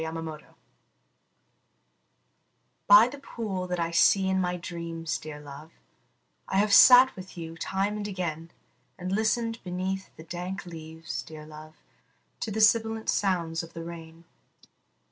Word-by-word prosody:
THE 160 Hz, 0 st, -3 dB
POOL 160 Hz, -1 st, -6 dB, 2.5 s
By 205 Hz, +3 st, +9 dB
the 280 Hz, +3 st, -9 dB
pool 205 Hz, -9 st, -5 dB
that 180 Hz, -1 st, -3 dB
I 170 Hz, 0 st, -1 dB
see 190 Hz, +3 st, +4 dB
in 190 Hz, 0 st, +1 dB
my 180 Hz, 0 st, -1 dB
dreams, 170 Hz, -2 st, -5 dB
dear 150 Hz, -1 st, -8 dB
love, 150 Hz, +2 st, -11 dB, 0.7 s
I 190 Hz, -, -1 dB
have 205 Hz, +1 st, +3 dB
sat 255 Hz, +3 st, +8 dB
with 185 Hz, -1 st, -11 dB
you 165 Hz, -1 st, -7 dB
time 195 Hz, +5 st, -2 dB
and 205 Hz, -1 st, -4 dB
again; 170 Hz, -4 st, -4 dB, 0.5 s
And 185 Hz, 0 st, -5 dB
listened 225 Hz, +2 st, 0 dB
beneath 185 Hz, +1 st, -4 dB
the 160 Hz, -, -10 dB
dank 180 Hz, +3 st, -6 dB
leaves, 160 Hz, -1 st, -7 dB
dear 155 Hz, -1 st, -11 dB
love, 155 Hz, 0 st, -12 dB, 0.6 s
To -, -, -3 dB
the 215 Hz, +1 st, -1 dB
sibilant 220 Hz, +1 st, +3 dB
sound 170 Hz, -4 st, 0 dB
of 165 Hz, 0 st, -11 dB
the 165 Hz, -, -7 dB
rain. 165 Hz, -1 st, -10 dB
180 Hz, 145 wpm, -27 LUFS, 165-200 Hz, 2.5 s, By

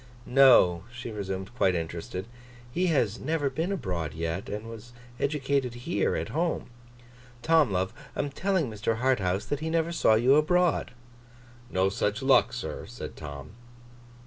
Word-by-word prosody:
'No,' 125 Hz, -10 st, +6 dB
she 120 Hz, -1 st, -7 dB
resumed, 95 Hz, 0 st, -5 dB
quite 95 Hz, -7 st, +2 dB
interested, 85 Hz, +3 st, -4 dB, 0.5 s
'he 180 Hz, +7 st, +1 dB
has 120 Hz, -, +1 dB
never 145 Hz, -1 st, -1 dB
been 165 Hz, +7 st, -2 dB
abroad 90 Hz, -, -3 dB
yet, 85 Hz, +3 st, -3 dB
and 105 Hz, +2 st, -5 dB
was 115 Hz, +1 st, -10 dB, 0.3 s
educated 140 Hz, -3 st, 0 dB
here, 170 Hz, -, +1 dB
at -, -, -3 dB
home. 165 Hz, -5 st, -2 dB, 0.7 s
Tom, 160 Hz, -4 st, +4 dB
love, 95 Hz, +3 st, -1 dB, 0.2 s
I -, -, 0 dB
am 145 Hz, -, -4 dB
telling 185 Hz, 0 st, 0 dB
Mr. 110 Hz, 0 st, -2 dB
Harthouse 105 Hz, -6 st, +1 dB
that 145 Hz, +4 st, -2 dB
he 160 Hz, +1 st, -3 dB
never 165 Hz, 0 st, 0 dB
saw 110 Hz, -9 st, +4 dB
you 125 Hz, +6 st, +5 dB
abroad.' 175 Hz, +2 st, +2 dB, 0.8 s
'No 95 Hz, +1 st, +2 dB
such 105 Hz, +4 st, -1 dB
luck, 135 Hz, 0 st, +5 dB
sir,' -, -, -5 dB
said -, -, -8 dB
Tom. 75 Hz, +1 st, -8 dB
120 Hz, 150 wpm, -28 LUFS, 95-150 Hz, 0.8 s, No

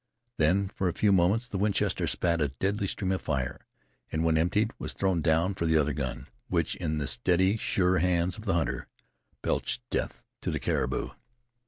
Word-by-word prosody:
Then 90 Hz, +6 st, +3 dB
for 95 Hz, -1 st, -1 dB
a -, -, -3 dB
few 105 Hz, -, +3 dB
moments 100 Hz, +6 st, +3 dB
the 100 Hz, -6 st, -4 dB
Winchester 105 Hz, 0 st, +1 dB
spat 85 Hz, -2 st, +1 dB
a 75 Hz, -, +3 dB
deadly 100 Hz, +9 st, -1 dB
stream 95 Hz, 0 st, -2 dB
of 95 Hz, -, -1 dB
fire, 65 Hz, -2 st, -3 dB, 0.4 s
and 80 Hz, +1 st, 0 dB
when 80 Hz, -1 st, +3 dB
emptied 100 Hz, +7 st, +2 dB
was -, -, -3 dB
thrown 95 Hz, -4 st, 0 dB
down 80 Hz, +4 st, +2 dB
for 85 Hz, -3 st, -2 dB
the 80 Hz, 0 st, +4 dB
other 75 Hz, -1 st, +2 dB
gun, 65 Hz, -4 st, -4 dB, 0.2 s
which -, -, 0 dB
in 80 Hz, -3 st, -2 dB
the 75 Hz, -, -1 dB
steady, 95 Hz, +6 st, +2 dB
sure 95 Hz, -4 st, +2 dB
hands 90 Hz, 0 st, +1 dB
of 110 Hz, -, -10 dB
the 95 Hz, -4 st, +1 dB
hunter 85 Hz, -, -1 dB, 0.6 s
belched -, -, -1 dB
death -, -, -3 dB, 0.2 s
to -, -, -2 dB
the -, -, -1 dB
caribou. -, -, -1 dB
90 Hz, 190 wpm, -28 LUFS, 80-95 Hz, 0.6 s, the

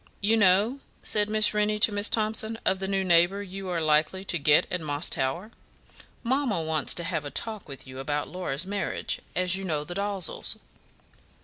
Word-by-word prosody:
"You 215 Hz, +3 st, +2 dB
know," 210 Hz, +5 st, +3 dB, 0.2 s
said 210 Hz, -1 st, +1 dB
Miss 215 Hz, -1 st, +4 dB
Rennie 210 Hz, 0 st, +1 dB
to 210 Hz, +1 st, +5 dB
Miss 205 Hz, +1 st, +3 dB
Thomson, 220 Hz, 0 st, +1 dB
"of 190 Hz, 0 st, +2 dB
the 190 Hz, -, -3 dB
new 195 Hz, 0 st, 0 dB
neighbour 175 Hz, +3 st, +3 dB
you 195 Hz, 0 st, -7 dB
are 175 Hz, -2 st, -1 dB
likely 155 Hz, +4 st, +1 dB
to 175 Hz, -3 st, -1 dB
get 145 Hz, 0 st, +4 dB
at 180 Hz, -, -2 dB
Moss 145 Hz, 0 st, -1 dB
Tower? 155 Hz, +12 st, -2 dB, 0.7 s
Mamma 255 Hz, -5 st, 0 dB
wants 160 Hz, -2 st, +2 dB
to 170 Hz, -, -1 dB
have 165 Hz, -3 st, -3 dB
a 145 Hz, -, -5 dB
talk 215 Hz, 0 st, -5 dB
with 135 Hz, -, -8 dB
you 130 Hz, 0 st, -10 dB
about 145 Hz, +2 st, -2 dB
Laura's 180 Hz, -3 st, -3 dB
marriage, 200 Hz, +1 st, -3 dB
as 180 Hz, 0 st, +2 dB
you 195 Hz, -, -4 dB
know 155 Hz, -5 st, -2 dB
the 175 Hz, -, -7 dB
Dalzells." 200 Hz, -1 st, -2 dB
190 Hz, 190 wpm, -26 LUFS, 160-210 Hz, 0.7 s, to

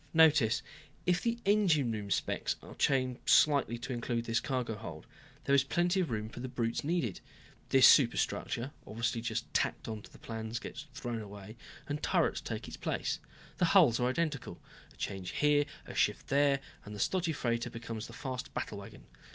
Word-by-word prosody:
"Notice 150 Hz, -8 st, +5 dB, 0.4 s
if 180 Hz, -1 st, +2 dB
the 235 Hz, 0 st, 0 dB
engine 180 Hz, -, +3 dB
room 105 Hz, -2 st, -4 dB
specs -, -, 0 dB
are -, -, -10 dB
changed 130 Hz, -2 st, 0 dB
slightly 140 Hz, -5 st, +5 dB
to 120 Hz, +2 st, -5 dB
include 120 Hz, -1 st, -2 dB
this 115 Hz, 0 st, +1 dB
cargo 125 Hz, -4 st, -2 dB
hold, 85 Hz, -8 st, -8 dB, 0.4 s
there 140 Hz, -, +1 dB
is 140 Hz, -1 st, +6 dB
plenty 175 Hz, +6 st, +1 dB
of 180 Hz, -, 0 dB
room 110 Hz, -2 st, -2 dB
for 115 Hz, -, -10 dB
the 130 Hz, -, -4 dB
brutes 115 Hz, -2 st, -2 dB
needed. 145 Hz, -, -1 dB, 0.5 s
This 135 Hz, -1 st, +8 dB
superstructure 125 Hz, 0 st, +3 dB, 0.2 s
obviously 115 Hz, +1 st, -1 dB
just 115 Hz, 0 st, -3 dB
tacked -, -, 0 dB
onto 110 Hz, -2 st, -6 dB
the -, -, -16 dB
plans 110 Hz, 0 st, -5 dB
gets 140 Hz, +4 st, -7 dB
thrown 120 Hz, -4 st, -3 dB
away, 100 Hz, +1 st, -9 dB, 0.3 s
and 145 Hz, 0 st, -3 dB
turrets -, -, +1 dB
take -, -, -5 dB
its -, -, -8 dB
place. -, -, -2 dB, 0.4 s
The 175 Hz, -, +3 dB
hulls 130 Hz, -11 st, +6 dB
are 125 Hz, 0 st, +2 dB
identical. 145 Hz, -1 st, -2 dB, 0.3 s
A -, -, -20 dB
change 95 Hz, -2 st, -4 dB
here, 145 Hz, 0 st, +3 dB, 0.2 s
a -, -, -8 dB
shift -, -, +1 dB
there, 140 Hz, 0 st, +3 dB, 0.2 s
and 105 Hz, 0 st, -8 dB
the -, -, -8 dB
stodgy 175 Hz, -, +1 dB
freighter 120 Hz, -5 st, -1 dB
becomes 115 Hz, -1 st, -6 dB
the -, -, -12 dB
fast 130 Hz, -2 st, -5 dB
battlewagon. 100 Hz, -1 st, -6 dB
125 Hz, 175 wpm, -32 LUFS, 115-145 Hz, 0.5 s, This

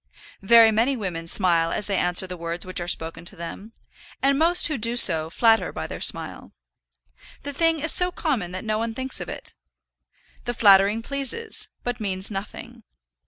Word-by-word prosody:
Very 225 Hz, +2 st, +6 dB
many 235 Hz, +5 st, +1 dB
women 175 Hz, -6 st, -5 dB
smile 170 Hz, -2 st, +1 dB
as 210 Hz, -, -2 dB
they 200 Hz, -, -2 dB
answer 180 Hz, 0 st, +1 dB
the 180 Hz, -1 st, -7 dB
words 170 Hz, +1 st, -5 dB
which 185 Hz, 0 st, -3 dB
are 175 Hz, -, -5 dB
spoken 165 Hz, -1 st, 0 dB
to 200 Hz, -, -8 dB
them, 180 Hz, +5 st, -9 dB, 0.5 s
and 275 Hz, +1 st, +1 dB
most 340 Hz, +2 st, +3 dB
who 305 Hz, -6 st, -4 dB
do 230 Hz, +2 st, +2 dB
so 160 Hz, -8 st, +5 dB
flatter 225 Hz, +5 st, +2 dB
by -, -, -6 dB
their -, -, -8 dB
smile. -, -, -1 dB, 0.9 s
The 285 Hz, -, -6 dB
thing 330 Hz, +2 st, +1 dB
is 320 Hz, +2 st, +3 dB
so 360 Hz, 0 st, +3 dB
common 260 Hz, -, -3 dB
that 185 Hz, +3 st, -7 dB
no 215 Hz, 0 st, -1 dB
one 225 Hz, 0 st, -4 dB
thinks 260 Hz, +1 st, -3 dB
of -, -, -7 dB
it. -, -, -8 dB, 0.9 s
The 240 Hz, -, -4 dB
flattering 200 Hz, +1 st, +4 dB
pleases, 280 Hz, -, -5 dB
but 245 Hz, -1 st, -4 dB
means 195 Hz, -1 st, -3 dB
nothing. 195 Hz, 0 st, -8 dB
215 Hz, 180 wpm, -23 LUFS, 180-260 Hz, 0.9 s, Very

